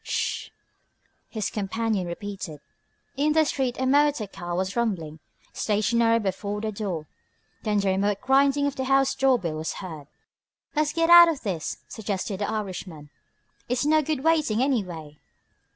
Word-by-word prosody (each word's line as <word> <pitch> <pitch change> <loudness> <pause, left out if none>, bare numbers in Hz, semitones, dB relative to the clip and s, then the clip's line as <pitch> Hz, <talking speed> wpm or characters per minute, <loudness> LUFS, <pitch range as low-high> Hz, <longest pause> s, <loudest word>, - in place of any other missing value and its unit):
"Sssh!" - - -2 0.8
his 215 -3 -3
companion 210 -1 -1
repeated. 185 -3 -6 0.6
In 300 +2 +2
the 315 0 +4
street 260 -4 -1
a 260 - 0
motor 285 -3 +3
car 175 -3 -6
was 190 +2 -2
rumbling, 175 -10 -2 0.3
stationary 230 +2 +2
before 205 0 -3
the 215 0 -3
door. 195 -7 -4 0.6
Then 210 -2 +1
the 195 - +1
remote 200 +1 +1
grinding 275 +3 +3
of 285 -1 -1
the 265 - -2
house 270 0 +3
door 270 -2 +3
bell 165 -7 -4
was 160 +1 -3
heard. 160 -7 -8 0.7
"Let's 300 0 +2
get 330 +1 +2
out 345 0 +10
of 310 -4 -2
this," 180 -8 -4
suggested 200 -2 -4
the 205 - -1
Irishman. 185 -8 -5 0.6
"It's 250 +2 0
no 310 +1 +4
good 300 -2 -2
waiting, 300 -8 +2
anyway." 175 - -2
215 Hz, 150 wpm, -25 LUFS, 190-270 Hz, 0.8 s, out